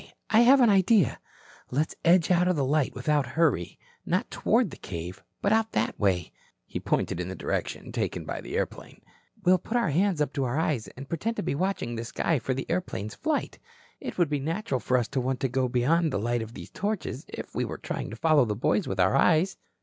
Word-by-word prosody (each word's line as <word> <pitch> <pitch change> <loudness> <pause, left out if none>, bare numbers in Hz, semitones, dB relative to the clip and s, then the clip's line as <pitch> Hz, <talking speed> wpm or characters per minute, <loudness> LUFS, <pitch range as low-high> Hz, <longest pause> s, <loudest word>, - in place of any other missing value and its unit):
I 220 - +6
have 260 +3 +7
an 240 - +6
idea. 195 - +4 0.5
Let's 150 +5 0
edge 170 0 +4
out 180 0 +4
of 180 - +2
the 140 -3 +1
light 145 0 +1
without 140 +1 +1
hurry, 140 - +1 0.3
not 185 +3 -1
toward 225 - +2
the - - -9
cave, 90 0 -7 0.2
but 200 - +3
out 225 0 +1
that 110 - -1
way," 90 -5 +1 0.5
pointing - - 0
in 90 - -3
the 95 - -5
direction - - -3
taken - - -2
by - - -4
the - - -4
airplane. - - -4 0.4
"We'll 185 0 +5
put 225 +7 -2
our 230 -10 +1
hands 180 +2 +2
up 150 - 0
to 140 - -1
our 125 +3 -1
eyes 150 -8 0
and 135 +1 -8
pretend 210 +10 -2
to - - -3
be 170 - -1
watching 180 -6 -1
the 115 0 -4
sky 145 +6 0
for 130 +1 -2
the 135 - -3
airplane's 165 - -3
flight. 310 -1 -2 0.4
It - - -6
would 170 -5 +2
be 145 - +1
natural 160 -1 -2
for 125 +1 +1
us 120 -2 0
to 135 -2 -1
want 130 +1 -1
to 135 - +2
get 130 0 0
beyond 155 +7 +2
the - - 0
light 120 +3 0
of 110 +2 -8
these - - -9
torches, 200 -9 -3
if - - -8
we - - -1
were - - -4
trying - - -4
to 115 - -7
follow 150 +1 +4
the 105 -2 -2
boys 150 - +1
with 95 - -3
our 95 +6 +4
eyes." 165 +6 +3
150 Hz, 225 wpm, -27 LUFS, 120-185 Hz, 0.5 s, have